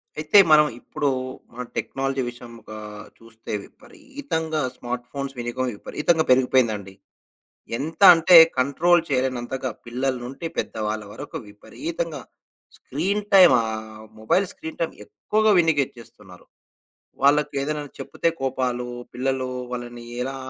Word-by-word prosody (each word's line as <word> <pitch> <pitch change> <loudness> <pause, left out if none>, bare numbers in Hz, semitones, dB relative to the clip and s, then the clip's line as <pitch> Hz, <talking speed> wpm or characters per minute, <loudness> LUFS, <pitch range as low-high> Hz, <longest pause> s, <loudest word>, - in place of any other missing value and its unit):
అయితే 155 +6 +5
మనం 150 0 +7
ఇప్పుడూ, 145 +1 -2 0.4
మన 125 +1 -5
టెక్నాలజీ 135 0 -2
విషయం 120 0 -11
ఒకా, 110 0 -10 0.4
చూస్తే 115 0 -12
విపరీతంగా 160 - -5
స్మార్ట్ 120 0 -5
ఫోన్స్ 140 -1 -5
వినియోగం. 120 +2 -2
విపరీతంగా 160 +8 0
పెరిగిపోయింది 125 -2 +4
అండి. 95 -1 -11 0.8
ఎంత 160 +6 -6
అంటే 165 +2 +7 0.2
కంట్రోల్ 165 +6 +3
చేయలేనంతగా. 130 -1 -1 0.2
పిల్లల 130 +3 -1
నుండి 135 +6 -6
పెద్ద - - -3
వాళ్ళ 105 0 -3
వరకు - - -7
విపరీతంగా 330 - -6 0.6
స్క్రీన్ 205 +2 -2
టైమ్ 185 -7 +8
ఆహ్, 110 -1 -6 0.2
మొబైల్ 170 - +2
స్క్రీన్ 160 - -9
టైమ్ 165 - -1
ఎక్కువగా 215 - +1
వినియోగించేస్తున్నారు. 120 - -2 0.8
వాళ్ళకి 145 +1 +3
ఏదైనా 150 +2 -2 0.2
చెప్తే 170 - -1
కోపాలు. 125 -2 -1 0.3
పిల్లలు 130 +1 -1 0.2
వాళ్ళని 120 -1 -6 0.2
ఎలా, 135 +1 -4
135 Hz, 115 wpm, -23 LUFS, 120-160 Hz, 0.8 s, టైమ్